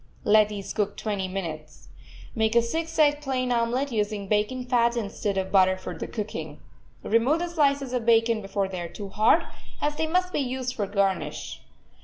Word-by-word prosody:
Let 210 0 +5
these 200 -2 -6
cook 205 -1 -1
twenty 200 -3 -2
minutes. 160 -5 -6 0.4
Make 220 -1 +1
a 235 - +5
six 325 +7 -3
egg 295 -1 +4
plain 255 -3 -1
omelet, 245 +4 0
using 210 -2 -2
bacon 215 +5 0
fat 240 -1 +2
instead 205 -2 -2
of 190 0 -2
butter 185 -1 +4
for 180 -2 -7
the - - -5
cooking. 215 -2 -5 0.4
Remove 230 +8 +3
the 350 +1 -3
slices 280 -5 +1
of 250 -2 0
bacon 225 -1 +3
before 195 0 -2
they 185 -2 -5
are 170 - -5
too 200 +2 -8
hard, 220 - +4 0.4
as 295 0 -1
they 320 0 0
must 365 +2 0
be - - +1
used 255 -1 -2
for 210 - -2
a 195 - -12
garnish. 195 -2 -1
225 Hz, 190 wpm, -26 LUFS, 200-260 Hz, 0.4 s, Let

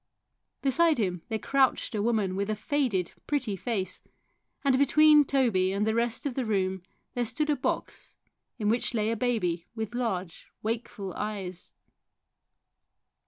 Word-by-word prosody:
Beside 315 +4 +4
him 180 -6 -1
there 220 - 0
crouched 265 +1 +1
a 210 - 0
woman 210 -4 +1
with 200 +2 -1
a 215 - +1
faded, 220 - 0 0.2
pretty 265 -9 0
face, 195 -1 -3 0.6
and 270 -2 +3
between 300 +2 +6
Toby 235 -10 +2
and 200 +2 0
the 220 - +1
rest 235 +3 -1
of 280 - -1
the 260 - -1
room 190 -4 0 0.3
there 245 - 0
stood 300 +6 0
a - - +3
box - - -4 0.4
in 210 -3 -1
which 235 +3 +1
lay 215 0 +1
a - - 0
baby 205 -8 -1
with 220 -1 -4
large, 190 -8 -3 0.2
wakeful 215 -4 -3
eyes. 195 -4 -5
220 Hz, 150 wpm, -28 LUFS, 195-255 Hz, 0.6 s, between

